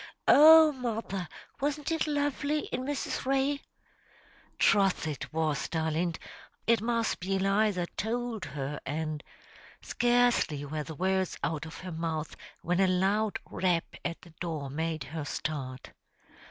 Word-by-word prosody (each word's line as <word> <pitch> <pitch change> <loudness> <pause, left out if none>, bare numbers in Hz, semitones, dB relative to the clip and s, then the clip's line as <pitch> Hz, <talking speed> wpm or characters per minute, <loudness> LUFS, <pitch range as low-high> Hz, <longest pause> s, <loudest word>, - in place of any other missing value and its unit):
"Oh, 315 +1 +9
mother, 225 - -3 0.3
wasn't 290 +2 -1
it 320 -1 0
lovely 290 0 0
in 250 - -2
Mrs. 280 +1 -3
Ray?" 275 +2 +1 1.0
"Troth 195 -5 +3
it 150 -4 -4
was, 155 -2 -1
darlint. 160 +1 -1 0.5
It 230 -2 +3
must 230 0 0
be 190 +2 -1
Eliza 195 -1 +2
tould 230 0 -2
her, 140 0 -4
and 155 0 -3 0.3
" - - -22
"Scarcely 240 -12 +2
were 150 +2 -3
the 160 +1 -7
words 190 +2 0
out 160 0 -2
of 160 - -9
her 185 0 -6
mouth, 160 -1 -3 0.3
when 180 +2 +1
a 190 - +5
loud 195 +4 +1
rap 175 -3 0
at 170 -1 -3
the 170 - -14
door 155 -6 -3
made 160 0 -2
her 155 +3 -5
start. 140 -3 -4
185 Hz, 140 wpm, -29 LUFS, 160-240 Hz, 1.0 s, Oh